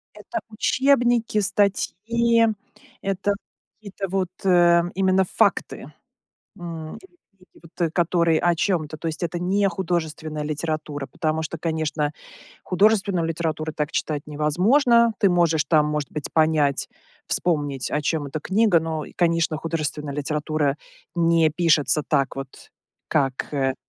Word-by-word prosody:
Это 345 - -5
учебники, 240 -1 +2
статьи, 230 +4 +2 0.5
это 195 +1 -1 0.4
какие-то 200 -2 -6
вот, 190 -1 -1
э, 175 -2 +5
именно 190 0 +3
факты, - - 0 0.7
м, 165 -3 -7
или 375 -2 -17 0.2
книги, 185 -1 -24
вот, 170 +2 -18
э, - - -4
которые 170 -1 +2
о 175 -1 +3
чем-то. 160 -4 -1
То 165 - -3
есть 155 +1 -6
это 170 0 -2
не 195 +3 +1
художественная 160 -4 -3
литература, 155 -2 -3
потому 160 -1 -2
что, 160 +1 -5
конечно, 155 -2 -1 0.5
художественную 195 -2 +2
литературу 160 -1 -2
так 150 +1 -3
читать 150 -2 -2
невозможно. 220 - +3
Ты 200 - +4
можешь 165 -3 +2
там, 150 -2 +3
может 150 -2 -2
быть, 150 -2 -5
понять, 155 -3 +2 0.4
вспомнить, 145 -6 -1
о 150 - 0
чем 150 0 -1
эта 145 +3 -5
книга, 200 +1 +3
но, 160 -1 -3
и - - -13
конечно, 165 -2 +1
художественная 150 -3 -3
литература 150 0 -1 0.4
не 165 -2 +3
пишется 155 -2 +2
так 135 -1 +1
вот, 135 -1 -9 0.4
как 135 -2 -1
э 135 -2 0
165 Hz, 135 wpm, -23 LUFS, 150-190 Hz, 0.7 s, э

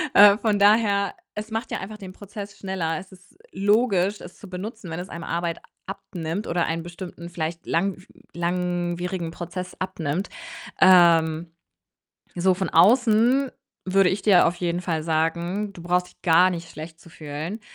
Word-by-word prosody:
Äh, 205 0 +9
von 215 -3 +1
daher, 205 -1 +4 0.2
es 215 +1 -6
macht 225 +1 -3
ja - - -2
einfach 210 +3 -7
den 190 -3 -10
Prozess 205 0 -9
schneller. 180 -5 -2
Es 185 +3 -10
ist 185 +1 -19
logisch, 205 -1 +2
es 175 - -12
zu 200 - -12
benutzen, 195 +1 -7
wenn 160 +2 -4
es 180 - -7
einem 170 -1 -7
Arbeit 170 0 -2 0.3
abnimmt 195 -1 -5
oder 175 0 0
einen 165 +1 -2
bestimmten, 175 0 -9
vielleicht 165 0 -4
langw 185 +2 0 0.3
langwierigen 175 0 -2
Prozess 180 +2 -6
abnimmt. 185 -1 -3 0.5
Ähm, 170 -3 +5 0.8
so 185 +1 +3
von 190 +1 -2
außen 245 +4 +4 0.4
würde 190 -1 +4
ich 190 - -2
dir 195 -4 +6
auf 170 - -1
jeden 175 0 -2
Fall 160 -4 -2
sagen, 170 +5 -1
du 180 -3 -12
brauchst 180 +1 +1
dich - - -23
gar 180 +1 +5
nicht 170 -2 -5
schlecht 160 +1 -9
zu 170 - -17
fühlen. 155 +7 -6
180 Hz, 160 wpm, -24 LUFS, 170-200 Hz, 0.8 s, Äh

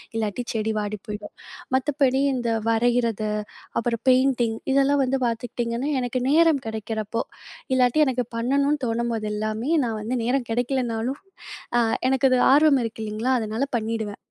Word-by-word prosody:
இல்லாட்டி 220 +2 -2
செடி 220 0 -1
வாடி 210 0 -3
போயிடும். 210 0 -7 0.4
மத்தபடி 270 0 +2
இந்த 240 -2 -2 0.2
வரையிறது, 230 -2 +1 0.5
அப்பறம் 230 -1 -2
பெயிண்டிங் 255 -3 +3 0.2
இதெல்லாம் 275 +1 +3
வந்து 265 +1 0
பார்த்துக்கிட்டீங்கன்னா, 235 +3 -2
எனக்கு 250 +1 -2
நேரம் 315 -2 +4
கிடைக்கிறப்போ, 220 0 -3 0.5
இல்லாட்டி 255 +4 +4
எனக்கு 250 -2 0
பண்ணணும்னு 280 +4 +1
தோணும்போது 230 -1 -1
எல்லாமே 215 +6 -2
நான் 225 -2 -3
வந்து 245 +4 -2
நேரம் 250 0 0
கிடைக்கலனாலும், 245 +2 -1 0.6
அ - - +4 0.3
எனக்கு 265 0 +3
அது 255 - +4
ஆர்வம் 290 -3 +5
இருக்கு 225 -1 -5
இல்லைங்களா? 220 +5 -1
அதனால 220 +4 -2
பண்ணிடுவேன். 220 -2 -3
240 Hz, 135 wpm, -24 LUFS, 225-265 Hz, 0.6 s, ஆர்வம்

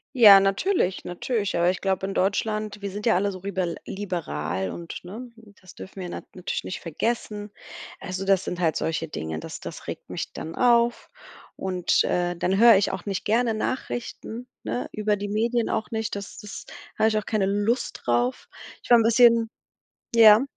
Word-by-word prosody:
Ja, 210 -6 +10
natürlich, 195 - +1
natürlich, 200 +3 -2
aber 170 +1 +3
ich 185 - -2
glaub 190 -1 0
in 195 0 -3
Deutschland, 210 +2 -1
wir 200 - -3
sind 205 +2 -6
ja 225 - +4
alle 200 +2 +1
so 185 - -7
ribel 185 -3 -2
liberal 95 - -3
und 170 -1 -8
ne, 225 +7 -9 0.3
das 185 -1 -15
dürfen 190 0 -9
wir 180 - -5
nat - - -7
natürlich 180 - -3
nicht - - -5
vergessen. 210 +4 -3 0.5
Also, 190 0 -5
das 195 -1 +3
sind 180 - -4
halt 165 -3 +1
solche 165 0 -2
Dinge, 80 - -5
das - - -8
das - - -8
regt - - -7
mich - - -5
dann 160 +1 -7
auf. 235 -1 +3 0.5
Und, 185 -2 +1
äh, 175 0 0
dann 185 +3 0
hör 230 +2 +8
ich 195 - +2
auch 190 -1 -6
nicht 195 -2 -3
gerne 230 +2 +2
Nachrichten, 240 +1 -4 0.2
ne? 245 - -3
über 210 0 0
die 205 0 -5
Medien 230 +3 0
auch 220 0 -2
nicht, 220 -2 -2
das 200 -1 -7
das 210 -2 -9 0.3
hab 220 - +4
ich 215 -1 +1
auch 210 - -2
keine 215 -3 +1
Lust 205 +5 -1
drauf. 120 +1 0 0.3
Ich - - -14
war 240 - +8
'n 230 - +3
bisschen 230 0 +5 0.6
ja? 220 0 +8
200 Hz, 185 wpm, -25 LUFS, 180-225 Hz, 0.6 s, Ja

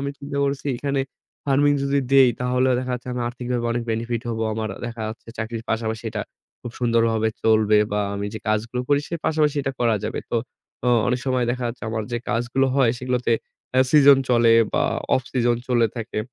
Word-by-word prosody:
আমি 140 0 -2
চিন্তা 140 0 -5
করছি 140 0 -2
এখানে 140 +1 -1 0.4
farming 145 +1 +3
যদি 140 0 +1
দেই, 135 -2 +7
তাহলে 125 +1 +1
দেখা 130 0 -3
যাচ্ছে 125 +1 -8
আমি 125 - -3
আর্থিকভাবে 120 -1 -3
অনেক 120 0 -1
benefit 115 +1 -2
হব। 115 - -2 0.2
আমার 110 -1 -2 0.2
দেখা 115 -1 -6
যাচ্ছে 115 +1 -10
চাকরির 115 0 -4
পাশাপাশি 110 0 -2
এটা 105 -1 -3 0.4
খুব 120 - -7
সুন্দরভাবে 115 -2 +2
চলবে, 110 -1 +4
বা 105 - +1
আমি 100 0 -3
যে - - -4
কাজগুলো 115 +3 -1
করি 145 0 +3
সে 170 - -3
পাশাপাশি 150 -2 +2
এটা 135 - -2
করা 115 -3 +3
যাবে। - - -3
তো - - +1 0.5
অ - - +4 0.2
অনেক 125 +1 0
সময় 130 -1 +1
দেখা 125 0 -2
যাচ্ছে 115 - -8
আমার 110 -1 -2
যে 120 - 0
কাজগুলো 120 +3 +1
হয় 125 -4 +4
সেগুলোতে 125 -2 0 0.4
আ - - +6
season 140 -2 +7
চলে 115 -1 +5 0.2
বা - - +2 0.3
off 130 - 0
season 120 -2 +2
চলে 120 -2 +3
থাকে। 115 -1 -4
120 Hz, 195 wpm, -23 LUFS, 115-130 Hz, 0.5 s, দেই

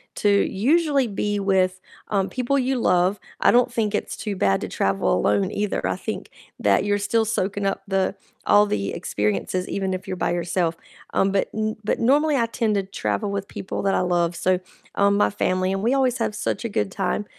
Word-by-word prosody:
to 205 - +1
usually 275 - +2
be 205 0 -2
with, 185 -2 +1 0.3
um, 195 -2 0
people 255 +2 0
you 260 0 +1
love, 180 -1 +2 0.2
I - - +6
don't 245 0 +4
think 220 -3 -1
it's 210 - -2
too 210 -2 -4
bad 95 - +2
to - - -3
travel 95 -11 +1
alone, 100 +8 +1
either, 205 -1 -2
I - - -1
think - - -5 0.3
that - - +3
you're 205 0 +2
still 220 +2 +1
soaking 205 -2 -1
up 195 - -1
the 195 -1 0 0.3
all 205 0 +6
the 100 - -2
experiences, 105 - -2
even 190 -1 -1
if 185 0 -5
you're 185 - -4
by 175 - 0
yourself, 170 -1 0 0.4
um, 195 - +2
but 195 - 0
n 215 0 -1
but 210 - 0
normally, 290 +6 +3
I 235 - +2
tend 225 -2 0
to 200 - +1
travel 200 +2 -2
with 200 0 -3
people 190 - -5
that 195 -1 +2
I - - +2
love, 175 -1 +1
so, 180 +2 +1 0.4
um, 200 0 +3
my 205 - +3
family, 185 -1 0
and 195 +1 -2
we 240 +4 +2
always 260 -2 +2
have 225 - -1
such 225 - -2
a - - -1
good 105 - -1
time, 210 - -1
200 Hz, 205 wpm, -23 LUFS, 185-220 Hz, 0.4 s, I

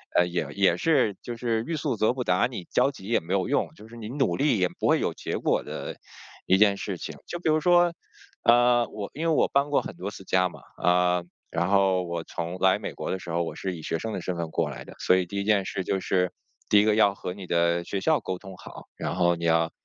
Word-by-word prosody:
呃， 90 - +5
也 90 0 -2
也 95 -3 +3
是 130 - +2
就 120 -1 -6
是 115 -2 -1
欲 165 - -1
速 140 -5 -1
则 110 +2 +2
不 125 -1 -3
达， 90 +5 +2
你 115 -8 -7
焦 125 +2 +3
急 115 -9 -11
也 115 +2 +2
没 85 +4 -5
有 95 +1 +1
用， 145 - +1
就 110 - -14
是 120 - -13
你 110 -1 -7
努 135 +1 0
力 140 -5 +2
也 90 -1 +2
不 - - +1
会 - - +4
有 - - -1
结 - - -4
果 - - +1
的 - - -6 0.5
一 95 - +5
件 100 -1 +5
事 - - -4
情。 - - -7
就 175 - -4
比 165 -2 -1
如 155 0 +3
说， 175 0 +4 0.5
呃， 120 0 +4
我 100 -2 -6
因 165 +3 -2
为 - - +3
我 - - +3
搬 140 +1 +1
过 145 - +2
很 - - -7
多 100 +2 -5
次 95 - -10
家 90 -1 +2
嘛， - - -13 0.2
呃， 90 0 +3 0.3
然 90 - 0
后 95 -2 +3
我 85 -1 -4
从 85 +2 -5
来 95 0 +3
美 - - -5
国 - - -4
的 95 - -2
时 85 - -10
候， 85 +1 0
我 - - -5
是 95 -2 -4
以 80 - -10
学 80 - -2
生 110 -1 -4
的 - - -3
身 90 - -2
份 85 -1 -3
过 80 -2 -1
来 - - -8
的。 - - -12
所 95 - +3
以 90 -2 -1
第 100 +2 -4
1 - - -1
件 100 -2 +2
事 95 - -3
就 95 - -1
是 90 -1 0 0.4
第 105 - +5
一 - - +5
个 105 -1 +3
要 100 -2 +4
和 90 -1 -6
你 95 -2 -8
的 85 0 +1
学 95 +1 -4
校 155 -2 +3
沟 95 - -4
通 95 -2 -11
好， - - -12
然 - - -3
后 85 -1 +3
你 85 0 -5
要 80 0 +2
95 Hz, 285 characters per minute, -26 LUFS, 90-120 Hz, 0.5 s, 呃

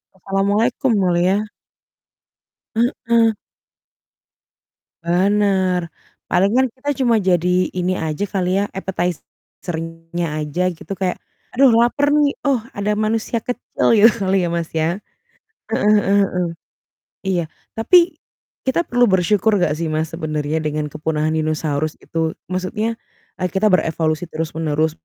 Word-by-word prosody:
Assalamualaikum, 200 - 0
Mulia. 185 +4 +2 1.3
Heeh. 230 -1 +2 1.7
Benar. 190 0 +2 0.5
Paling 195 +3 +3
kan 260 - +5
kita 275 +2 -5
cuma 235 -2 +4
jadi 180 0 +2
ini 185 0 -1
aja 160 +2 -2
kali 185 -1 0
ya, - - +1
appetizer-nya 170 -2 -5 0.2
aja 150 +4 -3
gitu 170 - -12
kayak, 185 -2 -1 0.4
"Aduh 270 +1 +6
laper 240 +5 +3
nih, 295 -1 +3
oh, 275 -3 +2 0.2
ada 205 +1 -1
manusia 220 +2 0
kecil," 245 +2 -3
gitu 220 +2 +7 0.2
kali 190 -1 +2
ya, 175 - 0
Mas, 170 -1 -2
ya. 165 +4 0 0.7
Heeh 210 - +2
heeh 200 -1 +2
heeh. 180 -1 -1 0.8
Iya, 185 -3 +1 0.3
tapi 340 +7 +4 0.5
kita 265 +6 +2
perlu 245 0 +4
bersyukur 200 +1 +2
nggak 150 - +2
sih, 165 0 -2
Mas, 155 0 -1
sebenarnya 155 -2 -2
dengan 150 0 -2
kepunahan 155 0 -1
dinosaurus 155 -1 -1
itu, 160 -1 -2 0.2
maksudnya 210 +5 -2 0.4
e - - -14
kita 205 +3 +3
berevolusi 160 -2 +1
terus 160 0 -3
menerus. 155 0 +1
185 Hz, 120 wpm, -20 LUFS, 165-215 Hz, 1.7 s, gitu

